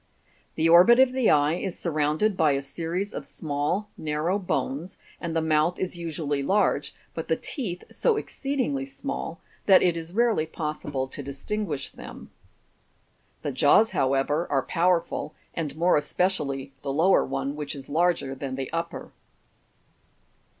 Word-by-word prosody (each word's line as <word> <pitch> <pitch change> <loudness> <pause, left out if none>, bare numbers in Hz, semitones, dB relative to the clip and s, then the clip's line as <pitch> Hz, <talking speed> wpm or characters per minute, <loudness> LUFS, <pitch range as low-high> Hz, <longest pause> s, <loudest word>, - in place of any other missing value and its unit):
The 160 - +2
orbit 180 +9 +7
of 260 -1 +6
the 255 -2 +2
eye 145 +1 +4
is 190 -2 -4
surrounded 155 +5 +1
by 155 -5 +3
a 135 0 -1
series 170 +8 -3
of - - -4
small 155 +7 -2
narrow 155 +5 0
bones, 155 -1 -3 0.2
and 170 -2 -4
the 165 - +1
mouth 160 +2 +2
is 185 -1 -2
usually 155 -4 -2
large, 145 -4 +1 0.2
but 165 - -5
the 160 - +2
teeth 180 - -5
so 460 -3 +2
exceedingly 275 - -2
small 275 - -5 0.3
that 190 -2 +7
it 175 -2 +3
is 165 0 -6
rarely 225 -6 +2
possible 150 -4 -3
to 145 - -7
distinguish 145 +4 -3
them. - - -11 1.1
The 145 - -1
jaws, 145 - +5
however, 145 +1 +1
are 135 -1 +1
powerful, 170 -1 0 0.2
and 150 -4 -3
more 175 +2 +4
especially 145 -4 -1
the 140 - -3
lower 165 +7 +4
one, 135 +1 -3
which 150 -1 -4
is 135 -1 -8
larger 165 -3 +1
than 135 -1 -5
the 135 -1 -5
upper. 165 0 -4
165 Hz, 150 wpm, -26 LUFS, 145-185 Hz, 1.1 s, orbit